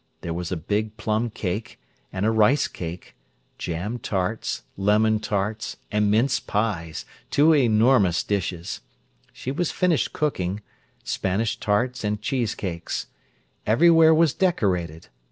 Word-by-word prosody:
There 85 - -4
was 85 +1 -4
a 90 - -1
big 105 +6 -2
plum 110 +2 0
cake, 105 0 -4 0.3
and 95 +2 -2
a 110 - +3
rice 115 +6 +4
cake, 85 0 -8 0.4
jam 90 +8 -3
tarts, 95 +1 -2
lemon 105 +2 +3
tarts, 105 +1 -2
and 105 0 +2
mince 115 +6 +2
pies—two 105 - 0
enormous 115 - +4
dishes. 95 -3 -3 0.5
She 130 - -5
was 170 +4 -1
finishing 180 -4 +1
cooking—Spanish 100 -3 -3
tarts 120 +4 0
and 105 0 -1
cheese 115 +1 -1
cakes. 85 -4 -4 0.6
Everywhere 160 +7 +6
was 160 -3 +4
decorated. 90 - 0
105 Hz, 120 wpm, -24 LUFS, 95-125 Hz, 0.6 s, Everywhere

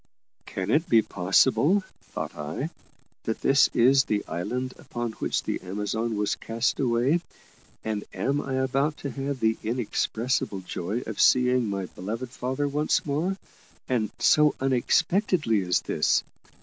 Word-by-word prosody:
"Can 95 +2 -3
it 155 +4 +2
be 115 -2 +5
possible," 130 - +3 0.2
thought - - -6
I, 80 - -4 0.5
"that 110 - -2
this 135 0 +5
is 135 +3 +5
the 105 -1 -1
island 125 +9 -3
upon 120 -1 -4
which - - -2
the - - -3
Amazon 105 +4 -2
was 105 0 +1
cast 115 +3 -1
away, 130 +6 +2 0.6
and 105 -2 -2
am 140 +1 -1
I 135 - -3
about 135 +3 0
to 140 - -2
have 140 -1 -3
the 110 0 +2
inexpressible 115 -2 -1
joy 95 +5 -3
of 110 - -3
seeing 125 -2 +4
my 100 -1 -2
beloved 115 +8 -6
father 130 +3 -2
once 150 +2 0
more, 160 +7 -1 0.5
and 115 -5 0
so 150 -1 +4
unexpectedly 135 - +2
as 90 -1 +1
this?" - - +1
125 Hz, 140 wpm, -26 LUFS, 110-140 Hz, 0.6 s, be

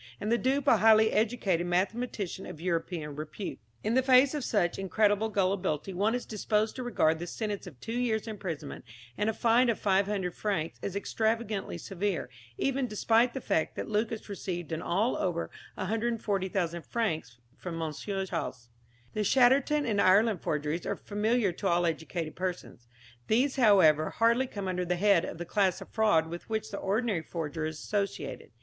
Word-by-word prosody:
And 215 - -2
the 235 - +4
dupe 270 +2 +1
a 230 - +6
highly 220 +1 +6
educated 210 -6 +1
mathematician 195 +1 -2
of 155 - -9
European 165 -3 -2
repute. 155 +6 -6 0.2
In 220 - 0
the 260 - +4
face 260 +1 +5
of 295 -3 -2
such 185 -8 0
incredible 205 +2 +2
gullibility 190 -4 0
one 205 +6 +1
is 245 - -3
disposed 215 0 0
to - - -3
regard 160 -10 +2
the 175 - -5
sentence 205 0 -4
of 145 -8 -12
two 225 - -6
years' 225 -3 0
imprisonment 175 -9 -6 0.3
and 210 - 0
a - - 0
fine 240 +2 +4
of 230 - +1
500 195 -2 +1
francs 185 -7 -2
as 195 - -4
extravagantly 220 -2 -1
severe, 185 -7 -3 0.3
even 275 -1 0
despite 230 +3 +2
the 265 - -3
fact 160 - 0
that - - -4
Lucas 220 +1 -2
received 180 -4 -5
in 160 0 -2
all 205 +8 +1
over 170 -2 -2 0.2
140,000 195 -5 -1
francs 160 - -2 0.2
from 170 -2 -6
M. 160 -1 -2
Chasles. 175 - -4 0.4
The 215 - 0
Chatterton 270 +6 +4
and 210 -4 +1
Ireland 200 +1 +4
forgeries 150 +2 -2
are - - 0
familiar 210 0 0
to 195 +3 -3
all 175 -1 +2
educated 165 0 -3
persons. 180 -9 -5 0.4
These, 260 +6 +2
however, 185 - +5
hardly 235 +3 +2
come 200 -5 -5
under 180 -1 -1
the 180 0 0
head 195 -2 +3
of - - -6
the 175 - -5
class 190 0 +1
of - - -10
fraud 210 -8 +3
with 170 +5 -8
which 220 -1 -2
the 200 - -4
ordinary 205 -2 0
forger 160 -1 -4
is 160 -1 -6
associated. 200 +3 -3
200 Hz, 170 wpm, -29 LUFS, 175-225 Hz, 0.4 s, a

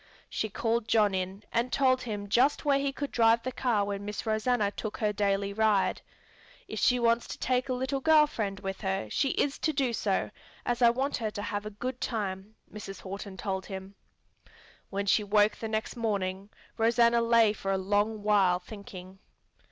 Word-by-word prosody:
She 220 - -2
called 225 +2 -1
John 210 -3 +3
in 190 +2 -3
and 235 +2 0
told 260 -2 +3
him 205 -4 -5
just 255 +9 +2
where 280 -1 +3
he 280 0 0
could 280 +1 -5
drive 230 0 +4
the 255 - -3
car 230 -5 0
when 200 0 -4
Miss 210 +2 -5
Rosanna 220 -1 +1
took 215 0 -5
her 210 -2 0
daily 200 -1 0
ride. 215 -2 +2 0.7
"If - - -5
she 250 - +4
wants 235 0 +2
to - - -6
take 255 +2 0
a - - +1
little 260 +2 -1
girl 310 +2 +6
friend 205 -9 -4
with 195 -1 -5
her, 190 - -2
she 275 - +1
is 280 +1 0
to 315 - +1
do 270 -5 0
so, 200 -3 -1 0.3
as 240 0 -1
I 235 - +7
want 265 +4 -1
her 225 -3 -2
to 205 0 -6
have 205 0 -3
a 210 -1 -10
good 250 +2 -4
time," 205 -2 -3 0.2
Mrs. 195 -2 -8
Horton 195 0 -7
told 190 -2 -3
him. 190 0 -7 1.0
When 200 0 -2
she 210 +2 +3
woke 205 +1 +3
the 225 - -4
next 220 0 -3
morning, 200 -4 -2 0.3
Rosanna 235 +1 +4
lay 230 -2 +4
for 195 -2 -3
a 195 - +1
long 205 +3 0
while 200 -4 +4
thinking. 190 -1 -11
215 Hz, 190 wpm, -29 LUFS, 200-240 Hz, 1.0 s, I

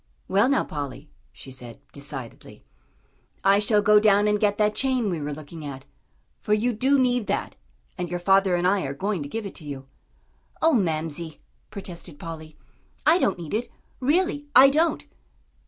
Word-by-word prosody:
"Well, 200 +6 +3
now, 275 - +2
Polly," 145 0 -7 0.2
she 135 - -12
said, 125 -3 -9
decidedly, 140 -4 -8 0.8
"I 195 +1 +5
shall 210 0 +2
go 210 0 +6
down 205 -1 +4
and 210 0 +2
get 205 -1 +1
that 210 0 +2
chain 255 -4 0
we 165 -3 -3
were 145 +1 -3
looking 155 +2 -9
at. 135 -2 -7 0.5
For 210 - +1
you 240 +3 0
do 265 +6 +2
need 245 -4 +1
that, - - -2 0.4
and 175 -1 -3
your 175 - -2
father 195 0 +3
and 175 0 0
I 195 +1 +2
are 135 0 -4
going 195 +2 -2
to 140 - -6
give 225 +6 -4
it 200 - -6
to 165 - -10
you." 140 -2 -7 0.7
"Oh, 325 0 +3
Mamsie," 160 - -1 0.3
protested 175 -5 -8
Polly, 160 -1 -9 0.5
"I 325 +4 +5
don't 195 - +1
need 165 -3 -7
it; 225 +3 -2 0.3
really, 290 +1 +1
I 270 +2 +9
don't." 320 +2 +1
195 Hz, 175 wpm, -25 LUFS, 155-225 Hz, 0.8 s, I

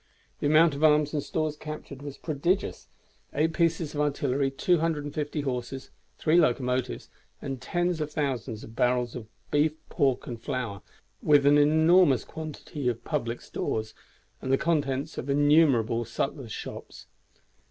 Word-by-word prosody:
The - - 0
amount 155 +1 +5
of 140 +2 -4
arms 150 -1 +4
and 150 - 0
stores 155 +1 -2
captured 150 -3 -8
was 145 -1 -7
prodigious: 170 +6 -1 0.5
Eight 160 +3 +2
pieces 165 -2 +1
of 150 - -1
artillery, 140 -2 0
250 150 0 0
horses, 130 -1 -4 0.3
3 160 +3 +3
locomotives, 125 -3 0 0.3
and 135 -2 -5
tens 175 +3 -1
of 150 0 -3
thousands 130 -7 -2
of 115 - -11
barrels 125 0 +1
of 115 -4 -7 0.2
beef, 150 +1 +3 0.2
pork, 135 -6 +1
and 115 -2 -7
flour, 120 -7 -3 0.4
with 145 -2 +4
an 145 +1 +6
enormous 160 - +5
quantity 150 -3 -6
of 115 -2 -4
public 115 +1 -2
stores 110 0 -3 0.5
and 130 - -2
the 135 - +5
contents 145 -2 -1
of 135 - -6
innumerable 140 -6 +4
sutlers' 120 +1 -4
shops. - - -8
145 Hz, 140 wpm, -27 LUFS, 125-155 Hz, 0.5 s, an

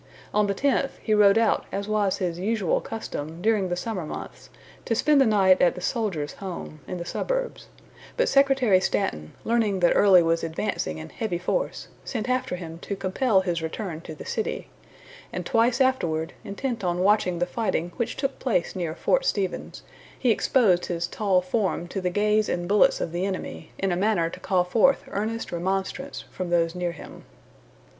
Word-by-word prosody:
On 210 0 +3
the 200 - -1
tenth, 275 +3 0
he 215 - +1
rode 205 0 +6
out 225 -1 +2
as 200 +1 -3
was 210 -3 +1
his 175 -3 -2
usual 205 -2 0
custom 165 -8 -6
during 205 -1 +1
the 175 - 0
summer 190 -1 -3
months, 150 - -8 0.4
to 230 - 0
spend 290 +4 +4
the 265 - +5
night 190 -3 +4
at 175 - +4
the - - -6
Soldiers' 180 -7 -2
Home, 180 -5 -6
in 180 - -4
the 170 - -5
suburbs; - - -3 0.5
but - - +3
Secretary 270 -8 +4
Stanton, 130 - -1
learning 220 -4 +1
that 175 - +5
Early 190 -4 +6
was 165 0 +1
advancing 165 - -2
in 80 0 -8
heavy 210 -6 -3
force, 340 - -2 0.2
sent 230 -2 -4
after 255 -5 0
him 165 -2 -8
to 200 - -4
compel 195 +2 +1
his 175 -3 -2
return 160 0 -4
to 160 -2 -8
the - - -10
city; 220 - -3 0.6
and - - -4
twice 235 +3 +2
afterward, 170 -12 +1
intent 225 +2 -4
on 175 0 0
watching 190 -3 +3
the 175 - +1
fighting 175 -3 -2
which 235 - -2
took 275 0 -2
place 220 -10 0
near 170 -3 -3
Fort - - +1
Stevens, 200 - -2 0.3
he 250 - +2
exposed 210 -6 +3
his 170 -1 -1
tall 190 -1 +1
form 185 -2 -1
to 195 - -3
the 180 - 0
gaze 210 +3 +2
and 175 0 -2
bullets 205 +1 +4
of 165 - -2
the 175 +2 -2
enemy 190 -1 -4
in 195 -1 0
a - - +1
manner 185 -3 +1
to - - -9
call 185 -1 +1
forth 225 +9 +3
earnest 220 +3 -3
remonstrance 190 +10 -3
from 185 -1 -4
those 165 -1 +2
near 175 -1 -2
him. 165 - -11
195 Hz, 185 wpm, -25 LUFS, 175-225 Hz, 0.6 s, rode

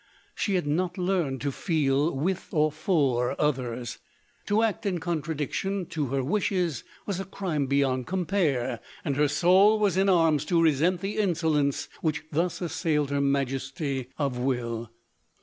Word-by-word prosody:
She 200 - -1
had 180 - 0
not 175 +6 -1
learned 180 -8 0
to 140 - -1
feel 145 -1 +1
with 180 +6 -1
or 155 -1 +2
for 140 -7 +1
others. 125 -5 -1 0.5
To 210 +2 +3
act 220 -3 0
in 190 -4 -1
contradiction 165 +4 -2
to 150 -3 -2
her 135 +1 -1
wishes 180 - 0 0.2
was 195 -3 -2
a - - -2
crime 175 -7 -2
beyond 135 -2 +1
compare, 170 - 0 0.3
and 140 - 0
hei 150 +1 +3
soul 185 +8 +5
was 205 -4 +1
in 195 +1 +3
arms 165 -5 +4
to 170 +1 +2
resent 165 +3 +3
the 195 +2 -3
insolence 160 -8 +1
which 155 -2 -1
thus 170 +5 -1
assailed 160 -4 0
her 140 0 +1
majesty 135 0 -1
of 140 -5 -1
will. 120 -3 -2
155 Hz, 150 wpm, -27 LUFS, 135-180 Hz, 0.5 s, soul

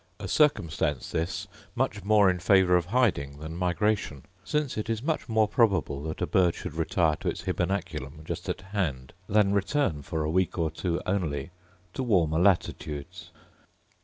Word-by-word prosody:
A 100 - -5
circumstance 80 - +1
this 90 +3 -2 0.3
much 120 -6 -1
more 105 0 +5
in 90 -1 +2
favour 90 0 +4
of 90 -1 +2
hiding 90 - +1
than 80 +2 -7
migration; 90 -4 0 0.2
since 150 +7 -1
it 110 +2 -4
is 115 +1 -2
much 155 -3 -2
more 110 -1 +3
probable 100 - +1
that 80 - -3
a - - +2
bird 90 -3 +2
should - - -6
retire 80 0 +1
to - - -2
its - - -5
hybernaculum 80 -5 -3
just - - -5
at - - -3
hand, 90 -10 -3 0.2
than 100 -1 +3
return 100 - 0
for 80 +2 -3
a 75 - -1
week 95 +1 +1
or 80 -2 0
two 85 +1 -2
only 80 -5 -2 0.4
to - - -3
warmer 85 -10 +2
latitudes. 80 -6 0
90 Hz, 165 wpm, -27 LUFS, 80-105 Hz, 0.4 s, more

